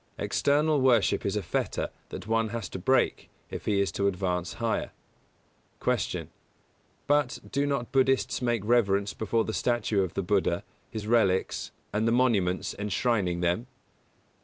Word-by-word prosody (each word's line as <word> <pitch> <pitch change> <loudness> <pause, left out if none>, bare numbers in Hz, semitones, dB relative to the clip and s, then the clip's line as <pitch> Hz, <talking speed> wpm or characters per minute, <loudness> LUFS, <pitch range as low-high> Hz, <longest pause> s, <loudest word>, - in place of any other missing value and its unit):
External 150 0 +2
worship 120 -5 +3
is 100 - -1
a 105 - -1
fetter - - -2 0.2
that - - -7
one 115 0 +1
has 115 -3 -4
to 95 - -6
break 130 +9 +1 0.2
if - - -6
he 105 -2 +2
is 100 -1 +1
to 100 +1 0
advance 90 -2 -1
higher. - - -1 0.9
180. - - 0
Q. - - -19 0.8
_But, 145 -3 0
do 140 +1 +1
not 140 -4 -2
Buddhists 135 -1 +2
make 120 -4 0
reverence 100 -4 +2
before 110 +1 0
the 110 - -4
statue 115 -4 +1
of 95 -3 -3
the 100 - -1
Buddha, 90 -2 +1 0.3
his 110 -2 -5
relics, 105 -5 +1 0.2
and 110 +2 +1
the - - +3
monuments 110 -7 +2
enshrining 100 -3 0
them? 90 +8 0
110 Hz, 155 wpm, -28 LUFS, 95-120 Hz, 0.9 s, worship